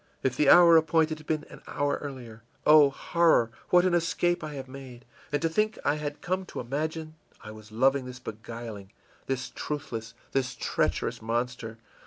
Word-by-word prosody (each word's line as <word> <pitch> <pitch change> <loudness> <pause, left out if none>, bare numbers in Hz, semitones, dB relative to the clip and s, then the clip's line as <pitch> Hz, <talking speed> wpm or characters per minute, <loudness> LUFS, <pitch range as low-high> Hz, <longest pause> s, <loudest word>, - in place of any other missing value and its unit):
If 130 -2 0
the 145 0 +3
hour 170 0 +8
appointed 160 -1 +2
had 155 - -16
been 155 -1 -1
an - - -12
hour 145 0 -1
earlier 125 -6 -8 0.2
Oh, 150 -2 +7
horror, 160 -4 +2 0.2
what 180 0 +5
an 185 - +2
escape 175 +1 +1
I 155 -1 -6
have 135 -1 -7
made! 130 -2 -11 0.3
And 145 - +1
to - - +4
think 215 +6 0
I 145 +1 +2
had 145 -1 -5
come 185 +1 -1
to - - -7
imagine 155 +5 -3 0.3
I 105 - -8
was 110 0 -13
loving 135 +4 +2
this 125 -1 -8
beguiling, 110 -3 -8 0.4
this 135 -1 -3
truthless, 115 -6 -5 0.2
this 130 -2 -1
treacherous - - -1
monster! 115 0 -3
140 Hz, 175 wpm, -28 LUFS, 120-160 Hz, 0.4 s, hour